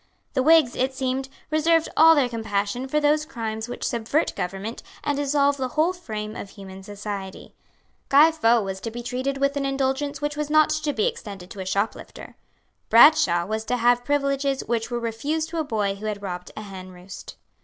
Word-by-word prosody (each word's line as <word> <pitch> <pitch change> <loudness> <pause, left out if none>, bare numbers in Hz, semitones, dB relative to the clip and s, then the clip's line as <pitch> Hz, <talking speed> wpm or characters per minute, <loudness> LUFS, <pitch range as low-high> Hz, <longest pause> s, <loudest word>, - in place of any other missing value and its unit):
The 260 - +1
Whigs, 310 -3 +5
it 260 +1 -1
seemed, 265 0 -2 0.2
reserved 325 +1 +3
all 325 +1 +7
their 280 -4 +3
compassion 220 +1 -2
for 300 +3 +1
those 300 +1 +2
crimes 225 -6 -5
which 245 - -6
subvert 235 +7 0
government 195 +6 -4 0.2
and 290 - 0
dissolve 285 0 +2
the 260 -1 -2
whole 330 +4 +3
frame 215 -11 -6
of 200 - -7
human 195 -1 -11
society. 200 -1 -7 0.6
Guy 295 +4 +7
Faux 235 -8 +2
was 190 0 -5
to 230 - -4
be 240 +2 -7
treated 260 +3 -2
with 280 +1 +1
an 280 - -1
indulgence 275 +1 -1
which 295 0 -2
was 300 0 -3
not 310 0 +4
to 310 -1 -1
be 430 +9 0
extended 200 - -5
to 200 - -9
a 190 - -5
shoplifter. 200 +3 -3 0.5
Bradshaw 230 - +6
was 220 +3 -3
to 250 +2 0
have 245 +1 +3
privileges 275 -1 0
which 230 -1 -1
were 240 -1 -2
refused 285 +8 -2
to 335 0 -3
a - - +1
boy 210 -7 -1
who 205 +2 -7
had 205 -1 -4
robbed 180 -2 -5
a 215 - -5
henroost. 185 -1 -10
250 Hz, 190 wpm, -24 LUFS, 210-290 Hz, 0.6 s, all